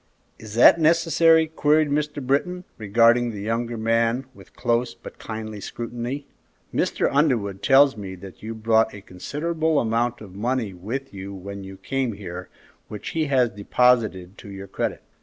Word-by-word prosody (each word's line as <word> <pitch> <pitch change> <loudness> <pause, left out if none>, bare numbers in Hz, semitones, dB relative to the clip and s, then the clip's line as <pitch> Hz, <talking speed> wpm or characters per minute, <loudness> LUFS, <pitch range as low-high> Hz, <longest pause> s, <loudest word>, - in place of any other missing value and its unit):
"Is 110 -1 -9
that 125 +7 +7
necessary?" 165 0 +4
queried 155 -1 +2
Mr. 150 -2 -2
Britton, 180 +7 0 0.2
regarding 115 +3 +4
the 105 -3 -6
younger 115 +2 -2
man 115 +3 +1
with - - -17
close 120 0 0
but 115 - -12
kindly 110 -1 -6
scrutiny. 120 +6 -5 0.5
"Mr. - - +1
Underwood 115 -10 +1
tells 135 0 +5
me 95 -3 -7
that 95 0 -12
you 115 +1 -6
brought 110 0 +2
a 100 - -10
considerable 155 - -1
amount 120 +1 0
of 100 -4 -11
money 115 0 -2
with 120 +9 -6
you 100 0 -7
when 100 +1 -8
you 95 0 -10
came 135 -1 -2
here, 90 -3 -8 0.4
which 105 - -7
he 160 -1 -1
has 130 -5 +2
deposited 105 -3 +1
to - - -11
your 100 0 -8
credit." - - -3
115 Hz, 160 wpm, -23 LUFS, 100-135 Hz, 0.5 s, that